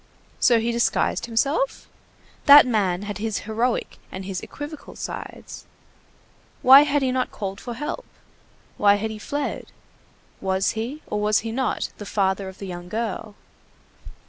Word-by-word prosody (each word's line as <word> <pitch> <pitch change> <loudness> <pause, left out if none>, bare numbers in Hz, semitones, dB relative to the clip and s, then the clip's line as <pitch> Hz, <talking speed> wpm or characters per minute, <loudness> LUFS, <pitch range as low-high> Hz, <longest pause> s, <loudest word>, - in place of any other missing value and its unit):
So 240 -2 +5
he 230 +1 0
disguised 235 0 0
himself? 280 - 0 0.6
That 285 0 +10
man 200 -6 0
had 205 -1 -5
his 220 0 -2
heroic 225 +3 -2
and 190 0 -6
his 190 -1 -4
equivocal 295 +1 -9
sides. - - -8 1.0
Why 265 +2 +10
had 290 -1 +1
he 260 - +1
not 255 0 0
called 195 -1 -6
for 240 -2 -6
help? 295 - -4 0.7
Why 205 -1 +5
had 220 +2 -3
he 215 - -7
fled? 285 +5 -4 0.7
Was 190 0 +1
he, 245 +8 -5
or 210 - -3
was 210 0 +2
he 225 - -2
not, 260 +2 -1
the 205 - -7
father 190 -1 0
of 190 - -13
the 200 - -7
young 175 -1 -7
girl? 215 -1 -4
220 Hz, 150 wpm, -23 LUFS, 200-255 Hz, 1.0 s, That